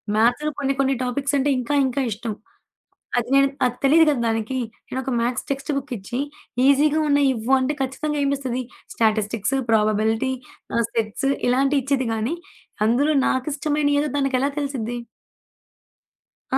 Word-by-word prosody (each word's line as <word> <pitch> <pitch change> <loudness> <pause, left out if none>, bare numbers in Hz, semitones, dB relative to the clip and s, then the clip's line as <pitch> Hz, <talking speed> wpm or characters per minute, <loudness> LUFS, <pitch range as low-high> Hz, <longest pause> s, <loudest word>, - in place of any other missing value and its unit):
మ్యాథ్స్‌లో 245 +7 +2
కొన్ని 275 -1 +1
కొన్ని 275 0 +3
టాపిక్సంటే 280 +2 0
ఇంకా 250 +4 -2
ఇంకా 260 +2 -1
ఇష్టం. 220 +1 -4 0.9
అది 240 - -1
నేను 275 0 +5 0.2
అది 245 -1 0
తెలీదు 320 +4 +6
కదా 265 -5 0
దానికి. 225 +3 -1 0.3
నేను 260 - -3
ఒక 265 0 -3
మ్యాథ్స్ 240 +1 -1
టెక్స్ట్ 275 +2 -2
బుక్ 275 -1 -4
ఇచ్చి 200 +5 -5 0.5
ఈజీగా 290 +2 +4
ఉన్నయి 285 -1 +4
ఇవ్వు 230 +3 -2
అంటే, 275 +3 0
ఖచ్చితంగా 295 +3 -2
ఏమిస్తది. 265 -3 -1 0.3
స్టాటిస్టిక్స్, 220 +1 +1 0.2
ప్రాబబిలిటీ 220 +3 +2 0.4
ఆహ్, 235 - +2
సెట్స్ 225 +4 -1 0.2
ఇలాంటియి 275 +3 +3
ఇచ్చిద్ది 270 -3 0
గానీ, 225 +9 -1 0.5
అందులో 285 +7 +3
నాకిష్టమైన 290 +2 0
ఏదో 295 -1 -1
దానికెలా 275 0 +1
తెలిసిద్ది? 245 -5 -3 1.5
ఆ! - - +3
260 Hz, 140 wpm, -22 LUFS, 235-280 Hz, 1.5 s, తెలీదు